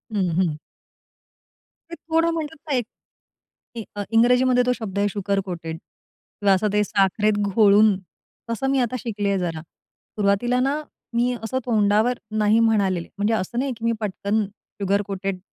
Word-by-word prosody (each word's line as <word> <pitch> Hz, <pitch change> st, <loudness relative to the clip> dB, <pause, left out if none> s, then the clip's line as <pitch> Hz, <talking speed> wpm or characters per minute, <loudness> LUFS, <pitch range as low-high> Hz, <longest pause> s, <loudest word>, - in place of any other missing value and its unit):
हं, 185 Hz, -3 st, +1 dB
हं. 170 Hz, -5 st, +1 dB, 1.3 s
ते 335 Hz, -, -6 dB
थोडं 330 Hz, 0 st, 0 dB
म्हणू 320 Hz, -2 st, -2 dB, 0.2 s
का 290 Hz, -, -1 dB
एक? 245 Hz, -3 st, 0 dB, 0.9 s
ते 230 Hz, -, -4 dB
अ, 205 Hz, -, -3 dB
इंग्रजीमध्ये 250 Hz, +2 st, +4 dB
तो 250 Hz, -, +2 dB
शब्द 205 Hz, -5 st, -6 dB
आहे 205 Hz, -, +2 dB
शुगर 200 Hz, 0 st, -1 dB
कोटेड 165 Hz, -2 st, -5 dB
किंवा 195 Hz, +3 st, -3 dB
असं 205 Hz, +3 st, +1 dB
ते 210 Hz, -, +3 dB
साखरेत 205 Hz, +1 st, +1 dB, 0.2 s
घोळून 210 Hz, -1 st, +6 dB, 0.5 s
तसं 245 Hz, +4 st, -1 dB
मी 275 Hz, -, +2 dB
आता 245 Hz, 0 st, 0 dB
शिकली 210 Hz, -3 st, -3 dB
आहे 195 Hz, -, +1 dB
जरा. 165 Hz, -3 st, -3 dB
सुरुवातीला 205 Hz, +8 st, -2 dB
ना 275 Hz, +4 st, 0 dB, 0.3 s
मी 245 Hz, +1 st, +2 dB
असं 260 Hz, +4 st, -1 dB
तोंडावर 220 Hz, +1 st, +2 dB, 0.2 s
"नाही." 215 Hz, +1 st, +4 dB
म्हणालेले 200 Hz, -6 st, +2 dB
म्हणजे 205 Hz, +2 st, +1 dB
असं 220 Hz, +2 st, -2 dB
नाही 270 Hz, +1 st, -1 dB
की 230 Hz, -, -6 dB
मी 230 Hz, -, +3 dB
पटकन 210 Hz, +1 st, -1 dB, 0.4 s
शुगर 200 Hz, +1 st, +2 dB
कोटेड 195 Hz, -1 st, -3 dB
210 Hz, 160 wpm, -23 LUFS, 200-245 Hz, 1.3 s, घोळून